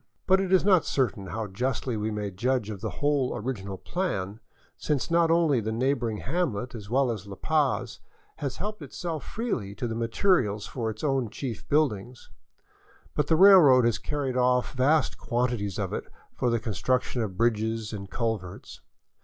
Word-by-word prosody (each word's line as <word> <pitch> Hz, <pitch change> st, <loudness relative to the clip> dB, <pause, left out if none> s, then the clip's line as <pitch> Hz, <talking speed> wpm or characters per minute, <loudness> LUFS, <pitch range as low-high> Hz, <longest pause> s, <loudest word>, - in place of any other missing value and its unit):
But 190 Hz, +1 st, +4 dB
it 190 Hz, -1 st, -2 dB
is 190 Hz, -1 st, +4 dB
not 185 Hz, -5 st, +5 dB
cer 130 Hz, -4 st, +1 dB
tain 95 Hz, -2 st, -10 dB
how 110 Hz, +4 st, -3 dB
justly 125 Hz, +4 st, -2 dB
we 105 Hz, 0 st, -1 dB
may 105 Hz, -2 st, -3 dB
judge 115 Hz, +2 st, -1 dB
of 100 Hz, -2 st, -7 dB
the 110 Hz, -, -2 dB, 0.2 s
whole 145 Hz, -3 st, +2 dB
original 100 Hz, -5 st, -4 dB
plan, 110 Hz, -, -3 dB, 0.4 s
since 150 Hz, +2 st, -2 dB
not 170 Hz, -1 st, +4 dB
only 165 Hz, -6 st, +3 dB
the 110 Hz, 0 st, -3 dB
neighboring 120 Hz, -2 st, 0 dB
hamlet, 130 Hz, -, -2 dB
as 105 Hz, -4 st, -8 dB
well 130 Hz, +1 st, +2 dB
as 105 Hz, -3 st, -6 dB
La 100 Hz, -, -7 dB
Paz, 150 Hz, +5 st, 0 dB, 0.4 s
has 140 Hz, -3 st, -4 dB
helped 210 Hz, +2 st, -5 dB
itself 165 Hz, -4 st, -5 dB
freely 130 Hz, -, -3 dB
to 120 Hz, -, -3 dB
the 115 Hz, -, -3 dB
materials 115 Hz, -, +1 dB
for 115 Hz, -4 st, -3 dB
its 110 Hz, 0 st, -7 dB
own 135 Hz, -5 st, +1 dB
chief 115 Hz, 0 st, -6 dB
buildings, 125 Hz, -6 st, 0 dB, 0.8 s
but 150 Hz, -, 0 dB
the 160 Hz, -, +4 dB
railroad 160 Hz, -9 st, +8 dB
has 115 Hz, -1 st, +1 dB
carried 140 Hz, -4 st, -3 dB
off 125 Hz, 0 st, +2 dB
vast 140 Hz, +2 st, +2 dB
quantities 120 Hz, -5 st, -1 dB
of -, -, -3 dB
it -, -, -3 dB, 0.3 s
for 125 Hz, -, 0 dB
the 115 Hz, 0 st, +1 dB
construction 120 Hz, -, -1 dB
of 100 Hz, -5 st, -4 dB
bridges 110 Hz, -1 st, 0 dB
and 100 Hz, -2 st, -6 dB
culverts. 110 Hz, -5 st, -4 dB
120 Hz, 175 wpm, -27 LUFS, 110-145 Hz, 0.8 s, railroad